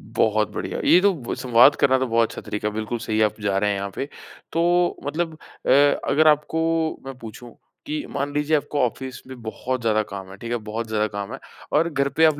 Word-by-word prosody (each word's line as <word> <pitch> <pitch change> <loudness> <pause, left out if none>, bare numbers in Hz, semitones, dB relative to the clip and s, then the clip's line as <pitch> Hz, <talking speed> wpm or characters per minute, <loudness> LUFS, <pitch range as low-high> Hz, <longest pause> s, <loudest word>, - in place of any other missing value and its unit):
बहुत 110 -1 +2
बढ़िया। - - -4
ये 180 - +7
तो 200 0 +4
ब 135 -9 -5
संवाद 125 +2 +5
करना 130 -1 +3
तो 130 - 0
बहुत 115 -1 +2
अच्छा - - -7
तरीका 105 0 -2
है, 105 - -3
बिल्कुल 110 +2 -3
सही 110 -2 -2
है 110 - +5
आप 105 - -2
जा 100 -1 0
रहे 105 +1 +2
हैं 100 - 0
यहाँ 100 0 -3
पे। 135 - -2 0.5
तो 175 +1 +2
मतलब 160 +3 -2 0.3
अ, - - +1 0.4
अगर 155 +1 +4
आपको 150 +2 +3 0.4
मैं 135 -1 -6
पूछूँ, 120 0 -10 0.3
कि 150 0 -3
मान 140 +1 -2
लीजिए 150 +1 +1
आपको 145 0 -3
ऑफ़िस 130 +2 -5
में 130 -2 -10
बहुत 120 +3 -3
ज़्यादा 110 -1 +2
काम 95 -2 -8
है, 95 - -10
ठीक 115 +2 -7
है? 120 - +1
बहुत 110 +1 -5
ज़्यादा 110 -1 0
काम 100 -1 -6
है - - -6 0.3
और 165 +3 +3
घर 140 -2 0
पे 160 - +6
आप 155 -2 +3
125 Hz, 230 wpm, -23 LUFS, 110-150 Hz, 0.5 s, ये